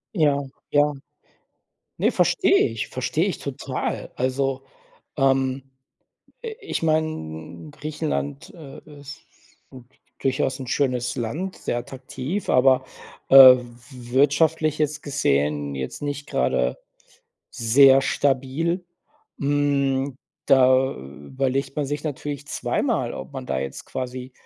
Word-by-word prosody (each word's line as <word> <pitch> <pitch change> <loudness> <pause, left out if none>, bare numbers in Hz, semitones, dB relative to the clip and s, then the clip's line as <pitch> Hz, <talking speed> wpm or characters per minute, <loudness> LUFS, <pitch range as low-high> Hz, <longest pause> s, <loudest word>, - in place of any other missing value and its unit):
Ja, 145 -4 +2 0.3
ja. 145 0 +3 1.0
Ne, - - +2
verstehe - - +3
ich, 115 -1 -4
verstehe - - -1
ich - - -3
total. - - -4
Also, 135 +1 -1 0.5
ähm, 135 -1 +1 0.8
äh, 450 -2 -5
ich 405 - -4
meine, 85 - -2
Griechenland, 150 -1 -4
äh, 150 -4 -11 0.2
ist 145 +1 -10 0.5
gut, 125 -2 -13 0.3
durchaus 130 0 -1
'n 130 - -6
schönes 125 -2 -1
Land, 155 +12 -4
sehr 120 - -3
attraktiv, 130 +8 -5
aber, 130 0 +4 0.5
äh, 135 - +8 0.2
w 125 - -7 0.3
w 120 -2 -11
wirtschaftlich 155 +3 +2
jetzt 150 0 -1
gesehen 75 - 0
jetzt 65 - -5
nicht 145 0 -4
gerade - - 0 0.7
sehr 135 +3 +5
stabil. 145 +8 0 0.6
Hm, 140 -2 0 0.3
da 130 0 +4
überlegt 130 - -4
man 145 -2 -1
sich 145 +1 -4
natürlich 145 0 -5
zweimal, - - -1
ob - - -8
man - - -7
da 65 - -1
jetzt 70 0 -6
quasi, 130 0 -6
135 Hz, 115 wpm, -23 LUFS, 125-145 Hz, 1.0 s, äh